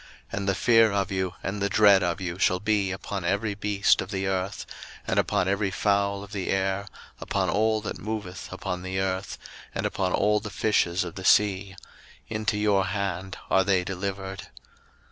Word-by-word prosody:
01:009:002 - - -4
And 100 0 -1
the 95 - +2
fear 115 +3 +5
of 100 0 -1
you 95 -1 -1
and 100 +1 -3
the 100 - +1
dread 100 -1 +6
of 90 0 -1
you 90 -1 -4
shall 90 -1 +3
be 105 -1 +1
upon 95 0 -4
every 100 +4 0
beast 100 0 +2
of - - -6
the 95 0 -2
earth, 95 0 -2 0.4
and - - +1
upon 90 - +1
every 100 +1 +1
fowl 100 +1 +1
of 100 - -12
the 100 -4 -3
air, 95 +1 0 0.3
upon - - -1
all 110 +1 +2
that 105 - -5
moveth 105 -4 -5
upon 90 +1 -4
the 95 +1 -3
earth, 95 0 -2 0.4
and - - -1
upon 95 -2 -1
all 105 +2 +3
the 105 0 -7
fishes 95 -4 +1
of 85 -2 -6
the 95 - -8
sea; 95 -1 +3 0.5
into 110 -1 -1
your 100 -2 +2
hand 95 -2 -3
are 95 - +5
they 95 -1 +2
delivered. 95 +1 -5
100 Hz, 185 wpm, -26 LUFS, 95-105 Hz, 0.5 s, dread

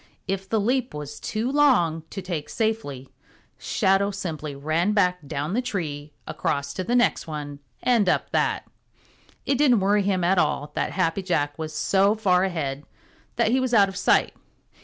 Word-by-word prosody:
If 195 0 -3
the 220 - +1
leap 250 - 0
was 150 0 -7
too 225 +4 -2
long 245 - +3
to 195 - -6
take 170 -5 -4
safely, 215 - -2 0.5
Shadow 195 +1 +2
simply 160 -7 -5
ran 160 +8 0
back 180 -3 +2
down 145 +6 -3
the 245 - +1
tree, 150 -11 -4
across 140 0 -2
to 185 - -3
the 240 +7 0
next 245 -7 +2
one 145 -2 -6 0.2
and 230 -7 +3
up - - 0
that. - - 0 0.8
It 275 -2 +1
didn't 255 -7 +5
worry 200 +2 +3
him 190 -2 0
at 180 +1 +3
all 150 -2 0
that - - -2
Happy 180 +1 0
Jack 145 -6 -1
was 155 -1 -4
so 195 +6 +2
far 185 -4 +2
ahead 150 -7 -2 0.5
that 220 - +2
he 260 - +3
was 255 -2 0
out 200 -2 +6
of 190 - -9
sight. - - +2
185 Hz, 175 wpm, -24 LUFS, 150-215 Hz, 0.8 s, out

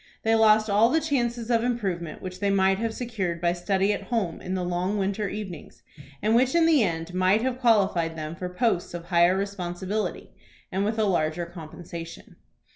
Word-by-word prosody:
They 225 - +2
lost 220 -1 +5
all 210 +3 +4
the 320 - +3
chances 240 -6 -1
of 230 -1 +3
improvement 190 -10 -3
which 185 0 -7
they 200 0 +1
might 195 0 +3
have 230 0 -1
secured 215 -8 -3
by 170 0 +1
study 195 +3 +1
at - - -4
home 215 -9 -2
in 185 +1 -3
the 185 - -2
long 180 +3 -1
winter 200 +1 -1
evenings, 195 -7 -8 0.4
and 215 +1 +2
which 255 +4 +3
in 335 -1 +5
the 320 -5 +5
end 165 -3 -2
might 185 +4 +2
have 255 -1 -1
qualified 195 -9 +2
them 155 0 -5
for 180 +1 -5
posts 180 -3 -1
of 170 -1 -7
higher 175 +1 +3
responsibility, 195 0 -3 0.4
and 190 +1 0
with 220 +2 -1
a 220 - +2
larger 170 -3 0
compensation. 170 0 -10
195 Hz, 190 wpm, -26 LUFS, 175-225 Hz, 0.4 s, lost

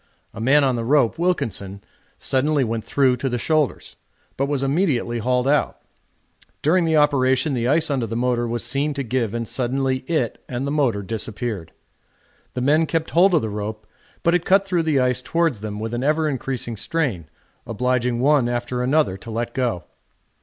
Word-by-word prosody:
A - - -7
man 140 +5 +4
on 130 -2 +2
the 115 - -2
rope, 135 +2 +2
Wilkinson, 100 - -2 0.3
suddenly 145 +2 +1
went 115 -2 -3
through 130 0 +2
to 135 +2 -2
the 125 - -1
shoulders, 155 +1 -1 0.4
but 140 - -1
was 140 -2 -1
immediately 135 -6 0
hauled 125 +3 +1
out. 145 +1 +1 0.9
During 170 +4 +3
the 160 -1 +2
operation 140 -1 +2
the 120 -2 0
ice 155 +3 +2
under 130 -5 0
the 115 - -4
motor 120 0 0
was 120 0 -1
seen 140 +2 0
to 140 - -2
give, 120 -2 -1
and 115 -1 -3
suddenly 130 +2 0
it 155 -9 -1
and 125 +2 -3
the 140 - -2
motor 130 -9 +1
disappeared. 110 -3 -4 0.8
The 125 - -2
men 155 +5 +3
kept 160 0 -2
hold 180 +2 +5
of 155 - +2
the 110 - -2
rope, 105 +1 -5 0.4
but 170 - +3
it 175 -1 +2
cut 195 +2 +3
through 180 -3 +1
the 155 -4 +1
ice 125 -1 +1
towards 165 -7 0
them 105 -1 -5
with 110 +1 -4
an 120 +2 -2
ever 155 +2 +2
increasing 130 -4 -3
strain, 110 - -2 0.4
obliging 125 +1 0
one 135 -2 +3
after 120 +1 -2
another 130 -6 +1
to 115 - -11
let 115 +1 -3
go. 120 -9 -1
130 Hz, 185 wpm, -22 LUFS, 115-150 Hz, 0.9 s, hold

